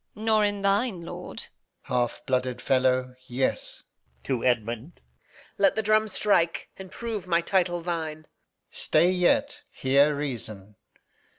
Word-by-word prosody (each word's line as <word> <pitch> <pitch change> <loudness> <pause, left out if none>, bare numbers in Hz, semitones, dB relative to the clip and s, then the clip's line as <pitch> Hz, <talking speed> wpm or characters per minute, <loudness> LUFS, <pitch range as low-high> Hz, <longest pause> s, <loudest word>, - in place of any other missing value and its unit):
Edm. - - -9
Nor 220 -1 +3
in 205 -1 -1
thine, 200 -1 +1
lord. - - -8
Alb. - - -4 0.4
Half 120 -1 -1
blooded 125 -1 -1
fellow, 130 -1 +1
yes. 130 +2 -2
Reg. 65 0 -41
[to 125 -4 -2
Edmund] 120 +4 -1 0.6
Let 290 - +4
the 220 - 0
drum 215 +1 +3
strike, 185 -5 +1
and 190 -1 -10
prove 220 -6 -5
my 170 -1 +3
title 175 -1 +1
thine. 160 -3 -3
Alb. - - -24 0.5
Stay 170 +4 +2
yet; 275 +11 +1
hear 140 +3 +3
reason. 110 -8 -6
165 Hz, 140 wpm, -26 LUFS, 125-200 Hz, 0.6 s, Let